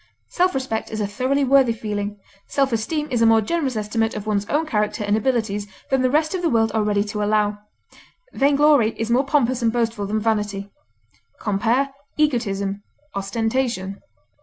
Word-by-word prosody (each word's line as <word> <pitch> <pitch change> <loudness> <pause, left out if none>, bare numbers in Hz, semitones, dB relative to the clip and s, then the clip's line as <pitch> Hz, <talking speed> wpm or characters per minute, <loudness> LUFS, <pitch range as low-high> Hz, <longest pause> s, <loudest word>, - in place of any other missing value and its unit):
Self 365 -2 +1
respect 260 -4 -2
is 220 - -4
a 210 - 0
thoroughly 255 +7 0
worthy 265 -3 +4
feeling; 210 -2 -4 0.3
self 275 -3 +1
esteem 295 +8 -1
is 240 -2 +1
a 230 - +6
more 225 0 +6
generous 270 +3 -1
estimate 220 +1 -1
of 210 -1 -5
one's 205 -1 -1
own 310 +3 +1
character 210 -5 -1
and 205 0 +1
abilities 220 -3 0 0.2
than 265 -1 +3
the 255 - +3
rest 310 +5 +1
of 370 - -2
the 340 - +1
world 225 -4 +2
are 220 - +2
ready 205 -1 +1
to 210 0 -4
allow. 210 0 +1 0.7
Vainglory 280 -4 +4
is 225 +1 -1
more 260 +3 +2
pompous 260 -4 +1
and 230 -1 +2
boastful 225 -3 -1
than 215 +2 0
vanity. 210 -2 -1 0.7
Compare 235 +7 +1 0.3
EGOTISM; 205 -9 0 0.3
OSTENTATION. 220 0 -2
225 Hz, 170 wpm, -22 LUFS, 210-265 Hz, 0.7 s, a